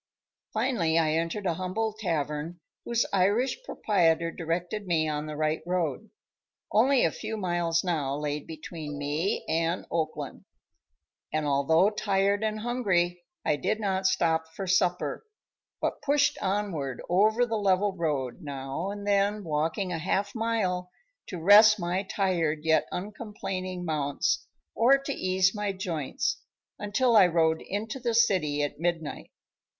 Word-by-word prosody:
Finally, 215 -9 +1
I 160 -2 +3
entered 165 +5 -1
a 175 - +2
humble 185 +6 -2
tavern 165 -4 -3 0.3
whose 235 0 +1
Irish 205 - +2
proprietor 170 - +1
directed 175 +5 -3
me 160 -3 +2
on 150 0 -2
the 155 - -5
right 155 +1 0
road. 180 +2 -1 0.6
Only 255 +5 +4
a - - +2
few 220 0 -5
miles 175 -3 0
now 150 -7 -1
lay 150 0 -2
between 155 -1 -7
me 150 +6 -1
and 165 +2 0
Oakland, 160 -1 -3 0.9
and 155 -1 -1
although 160 +7 +3
tired 200 0 +1
and 215 0 -1
hungry 185 -8 0 0.2
I 150 - +2
did 215 +10 -1
not 190 -2 0
stop 160 -3 +1
for 195 - -4
supper, 180 - +1 0.6
but - - -2
pushed 290 0 +2
onward 190 - -2
over 215 +7 +3
the 230 - -5
level 200 -1 +2
road, 150 -4 -2
now 140 +4 -4
and 205 0 -6
then 205 +1 +1
walking 165 +4 -1
a 165 - -2
half 200 +4 -1
mile 210 -6 -1 0.4
to 180 - -6
rest 210 +4 +7
my 175 +2 -1
tired 180 -6 0
yet 160 0 +3
uncomplaining 185 -2 -5
mounts 145 -3 -1 0.3
or 245 +6 +5
to 275 +1 -4
ease 185 -2 +2
my 210 -2 -2
joints, 175 -7 -2 0.4
until 230 +4 +1
I 200 -4 +8
rode 160 -2 +2
into 220 +6 -4
the 235 -2 -1
city 165 -11 +2
at 145 - -4
midnight. 165 -2 -2
180 Hz, 140 wpm, -28 LUFS, 160-210 Hz, 0.9 s, I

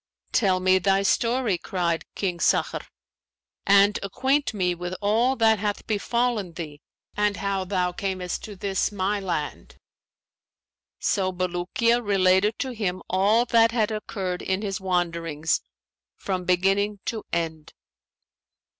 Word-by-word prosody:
'Tell 190 -5 +2
me 185 0 +4
thy 195 +1 +2
story,' 230 -2 +1
cried 170 -5 -1
King 180 -4 -2
Sakhr, - - +1 0.8
'and 200 +1 +5
acquaint 265 +8 0
me 185 -5 0
with 175 +1 -5
all 225 +6 +2
that 220 -3 +3
hath 205 0 -2
befallen 220 -3 -1
thee 155 -3 -7 0.3
and 210 -1 +1
how 195 -1 -1
thou 180 -1 0
camest 185 -1 -3
to 210 - -9
this 195 +1 -1
my 200 +1 -1
land.' 170 -6 -4 1.2
So 190 -2 0
Bulukiya 185 +6 0
related 195 +1 +3
to 265 - -3
him 195 -6 -3
all 205 +6 +3
that 230 -1 +5
had 220 -2 +1
occurred 190 -4 -4
in 190 +2 -1
his 195 -2 -3
wanderings 170 -4 0 0.6
from 185 -2 -3
beginning 195 +3 +1
to 220 -2 -3
end." 160 -2 -3
195 Hz, 130 wpm, -25 LUFS, 180-210 Hz, 1.2 s, and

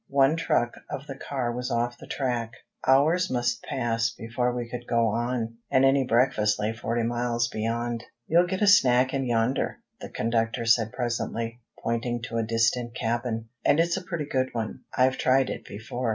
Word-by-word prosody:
One 140 +2 +4
truck 120 -7 +1 0.2
of 140 - -5
the 140 - -6
car 130 -3 -3
was 125 +1 -3
off 120 +1 -1
the - - -11
track. 120 -4 -2 0.3
Hours 155 +7 +4
must 120 -1 0
pass 115 -2 0
before 120 +1 -2
we 120 -1 -4
could 120 0 -7
go 115 -1 +2
on, 115 0 -2
and 130 +1 +4
any 135 0 +4
breakfast 115 -4 +3
lay 105 +1 0
forty 115 0 -2
miles 120 0 0
beyond. 115 +1 -2 0.2
"You'll 175 +2 +4
get 190 +3 -1
a - - +4
snack 130 -9 +5
in 135 -1 0
yonder," 120 +2 0 0.2
the - - -8
conductor 115 +1 -1
said 115 -1 +3
presently, 120 -1 -3 0.2
pointing 115 0 -1
to 115 -1 -4
a 115 - +1
distant 115 +1 +1
cabin. 115 -1 -2
"And 145 - +4
it's 170 +1 +2
a 190 - -3
pretty 170 -5 -3
good 130 -2 0
one. 110 -2 -3 0.2
I've 130 0 +3
tried 130 0 +3
it - - -6
before." 115 +4 -4
120 Hz, 180 wpm, -26 LUFS, 115-130 Hz, 0.3 s, snack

